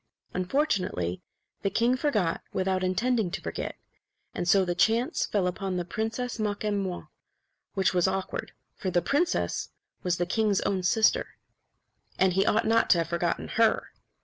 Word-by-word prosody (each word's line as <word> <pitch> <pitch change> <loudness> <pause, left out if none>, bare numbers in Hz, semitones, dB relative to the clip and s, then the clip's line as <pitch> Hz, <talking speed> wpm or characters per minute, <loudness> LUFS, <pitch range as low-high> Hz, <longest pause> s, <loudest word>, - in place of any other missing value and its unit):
Unfortunately, 185 - 0 0.4
the 195 - +1
king 235 +5 +2
forgot 220 - 0
without 185 0 0
intending 215 +3 +1
to - - -4
forget; - - -4 0.6
and 175 - -3
so 190 +1 +5
the 175 - 0
chance 225 +7 +2
fell 200 -3 +1
upon 185 +1 -2
the 175 - -2
Princess 225 +5 -3
Makemnoit, 205 -3 -2 0.7
which 190 -2 +2
was 180 0 +3
awkward. 190 0 -3 0.2
For 190 - -3
the 175 -1 +1
princess 340 - 0 0.3
was 180 -2 0
the 175 - 0
king's 205 +2 +1
own 190 -2 0
sister; 220 - +2 0.8
and 190 -1 +3
he 195 +3 +2
ought 215 - +3
not 225 +1 +3
to 175 - +6
have 165 -1 -1
forgotten 170 0 -1
her. 225 0 +2
195 Hz, 150 wpm, -28 LUFS, 180-225 Hz, 0.8 s, to